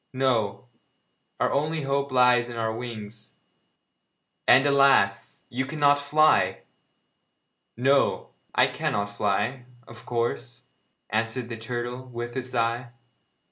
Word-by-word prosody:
No, 125 Hz, -6 st, 0 dB, 0.7 s
our -, -, +1 dB
only 155 Hz, +2 st, -1 dB
hope 140 Hz, 0 st, -1 dB
lies 125 Hz, -1 st, +4 dB
in 120 Hz, -, -7 dB
our 110 Hz, -1 st, -1 dB
wings 110 Hz, -2 st, -8 dB, 1.1 s
and, 135 Hz, +3 st, +6 dB
alas! 135 Hz, -9 st, +3 dB
you 130 Hz, +2 st, -3 dB
cannot 145 Hz, -1 st, +3 dB
fly!' 155 Hz, +2 st, +3 dB, 1.2 s
'No, 135 Hz, +3 st, +2 dB, 0.2 s
I -, -, +5 dB
cannot 100 Hz, 0 st, -2 dB
fly, 105 Hz, +5 st, -1 dB, 0.2 s
of 115 Hz, 0 st, -14 dB
course,' 115 Hz, -, -3 dB, 0.5 s
answered 115 Hz, +3 st, -1 dB
the 115 Hz, -, -5 dB
turtle, 120 Hz, +2 st, -5 dB
with 120 Hz, -1 st, -6 dB
a 130 Hz, -, -1 dB
sigh. 120 Hz, -1 st, -2 dB
120 Hz, 110 wpm, -25 LUFS, 115-135 Hz, 1.2 s, and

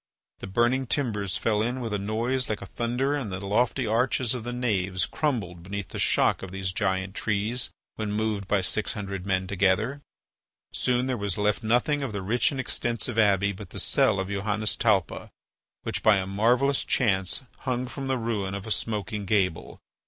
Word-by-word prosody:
The -, -, -6 dB
burning 120 Hz, +6 st, +2 dB
timbers 105 Hz, -9 st, 0 dB
fell 105 Hz, -2 st, +1 dB
in 120 Hz, +4 st, -1 dB
with 115 Hz, -4 st, -3 dB
a 105 Hz, -, 0 dB
noise 115 Hz, +6 st, 0 dB
like 105 Hz, -, 0 dB
thunder 125 Hz, +6 st, -1 dB
and 125 Hz, -9 st, -3 dB
the 95 Hz, -, -3 dB
lofty 120 Hz, +6 st, +1 dB
arches 115 Hz, +2 st, +1 dB
of 125 Hz, -3 st, -4 dB
the 120 Hz, -, -4 dB
naves 100 Hz, -7 st, 0 dB
crumbled 105 Hz, -, -2 dB
beneath 100 Hz, +2 st, -5 dB
the -, -, -6 dB
shock -, -, +3 dB
of 95 Hz, -, -6 dB
these 95 Hz, -1 st, -3 dB
giant 95 Hz, -2 st, 0 dB
trees 110 Hz, +4 st, 0 dB, 0.3 s
when 110 Hz, -2 st, -2 dB
moved 105 Hz, -2 st, -1 dB
by 100 Hz, -1 st, +2 dB
six 105 Hz, +3 st, +1 dB
hundred 100 Hz, -2 st, -5 dB
men 95 Hz, -1 st, +1 dB
together. 100 Hz, +8 st, +1 dB, 0.7 s
Soon 125 Hz, 0 st, +1 dB
there 130 Hz, -1 st, -1 dB
was 100 Hz, -3 st, -2 dB
left 105 Hz, +1 st, +1 dB
nothing 125 Hz, +6 st, +2 dB
of 135 Hz, -6 st, -3 dB
the 100 Hz, -2 st, -3 dB
rich 115 Hz, +5 st, +2 dB
and 140 Hz, -, -4 dB
extensive 120 Hz, -2 st, -1 dB
abbey 100 Hz, -2 st, +4 dB
but 100 Hz, -1 st, -9 dB
the -, -, -6 dB
cell 100 Hz, -, +3 dB
of 95 Hz, -, -2 dB
Johannes 105 Hz, +2 st, 0 dB
Talpa, 100 Hz, -6 st, +1 dB, 0.5 s
which, -, -, -1 dB
by 110 Hz, -2 st, +5 dB
a 95 Hz, -, -1 dB
marvellous 120 Hz, +8 st, +2 dB
chance, 95 Hz, -2 st, +1 dB, 0.2 s
hung 125 Hz, -1 st, -1 dB
from 135 Hz, +2 st, -5 dB
the 130 Hz, -1 st, +1 dB
ruin 105 Hz, -5 st, -2 dB
of 100 Hz, -, -6 dB
a 110 Hz, -, -5 dB
smoking 105 Hz, -1 st, -2 dB
gable. 90 Hz, -5 st, 0 dB
105 Hz, 185 wpm, -27 LUFS, 100-120 Hz, 0.7 s, by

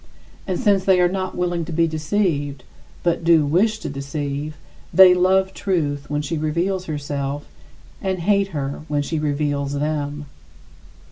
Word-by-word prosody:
And 185 Hz, -2 st, -1 dB
since 200 Hz, -5 st, +3 dB
they 190 Hz, -1 st, +4 dB
are 180 Hz, -, +5 dB
not 185 Hz, +1 st, -3 dB
willing 175 Hz, -1 st, 0 dB
to 170 Hz, -, -7 dB
be 165 Hz, +1 st, +2 dB
deceived, 155 Hz, -4 st, -1 dB, 0.4 s
but 170 Hz, -1 st, +1 dB
do 165 Hz, -3 st, +5 dB
wish 200 Hz, +9 st, +2 dB
to -, -, -4 dB
deceive, 140 Hz, +2 st, -4 dB, 0.3 s
they 190 Hz, -1 st, +8 dB
love 190 Hz, +1 st, +2 dB
truth 150 Hz, -9 st, -1 dB
when 150 Hz, 0 st, -1 dB
she 150 Hz, +2 st, -2 dB
reveals 175 Hz, +5 st, -1 dB
herself 145 Hz, -2 st, -4 dB, 0.5 s
and 190 Hz, -1 st, -1 dB
hate 200 Hz, +3 st, +2 dB
her 140 Hz, -6 st, -4 dB
when 145 Hz, -2 st, 0 dB
she 160 Hz, +2 st, -2 dB
reveals 145 Hz, -1 st, -1 dB
them. 145 Hz, 0 st, -2 dB
155 Hz, 150 wpm, -21 LUFS, 145-185 Hz, 0.5 s, they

